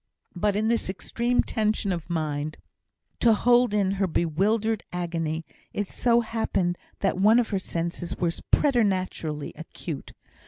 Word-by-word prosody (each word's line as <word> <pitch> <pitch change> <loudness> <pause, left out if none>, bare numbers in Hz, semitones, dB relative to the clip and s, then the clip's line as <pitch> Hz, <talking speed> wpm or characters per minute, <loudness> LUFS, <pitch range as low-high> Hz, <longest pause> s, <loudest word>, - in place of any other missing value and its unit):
But 200 +3 +1
in 215 +1 +1
this 230 -4 0
extreme 235 +5 0
tension 215 -2 0
of 170 -2 -4
mind 155 -2 -2 0.6
to 230 -2 +5
hold 245 +1 +4
in 200 -2 +2
her 195 0 +1
bewildered 200 +7 +1
agony, 165 -2 -2 0.3
it 205 -1 -2
so 235 -1 +3
happened 200 -6 -1 0.2
that 195 -2 +1
one 215 +4 +6
of 240 -2 +2
her 195 - 0
senses 170 -1 -4
was 170 -2 -1
preternaturally 185 - +1
acute. 160 -2 -7
195 Hz, 135 wpm, -26 LUFS, 170-220 Hz, 0.6 s, one